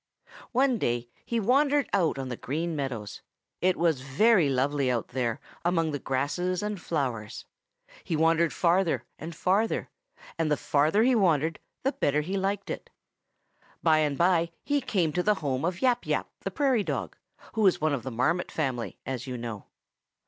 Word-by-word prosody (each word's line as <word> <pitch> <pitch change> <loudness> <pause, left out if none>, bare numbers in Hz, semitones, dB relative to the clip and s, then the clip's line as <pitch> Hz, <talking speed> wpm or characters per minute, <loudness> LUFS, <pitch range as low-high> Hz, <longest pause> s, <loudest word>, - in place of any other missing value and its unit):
One 255 -1 +2
day 120 -3 -1 0.2
he 235 - 0
wandered 280 +5 +3
out 175 -8 +2
on 135 -1 -4
the 120 - -3
Green 160 +8 -3
Meadows. 125 -8 -4 0.4
It 185 0 +2
was 165 -5 +2
very 160 - +4
lovely 135 +1 +1
out 120 -3 -1
there 120 -2 -1 0.2
among 165 -2 +1
the 145 - -3
grasses 175 +9 -1
and 210 -3 -3
flowers. 125 -11 -3 0.6
He 165 - -2
wandered 165 +1 +3
farther 175 0 +2 0.2
and 160 +1 -7
farther, 200 +7 +1 0.5
and 160 -2 +1
the 150 - +3
farther 155 +12 +2
he 255 +2 +4
wandered 165 - +2 0.2
the 270 - +2
better 150 - +1
he 185 +6 -3
liked 195 +1 -1
it. - - -6 0.9
By 155 -2 +5
and 145 -2 +1
by 170 -1 +3
he 285 -1 +1
came 185 - 0
to 180 - +1
the 210 +3 +3
home 140 -6 -2
of 175 +5 -2
Yap 245 -2 +2
Yap - - 0
the - - -3
Prairie 265 -7 +1
Dog, 135 - -3 0.4
who 215 -2 +3
is 185 - +3
one 155 -1 +1
of 135 - -1
the 130 - -5
Marmot 140 +9 0
family, 130 -6 -2
as 130 -1 -4
you 125 -1 -4
know. 115 -4 -6
165 Hz, 175 wpm, -28 LUFS, 135-195 Hz, 0.9 s, By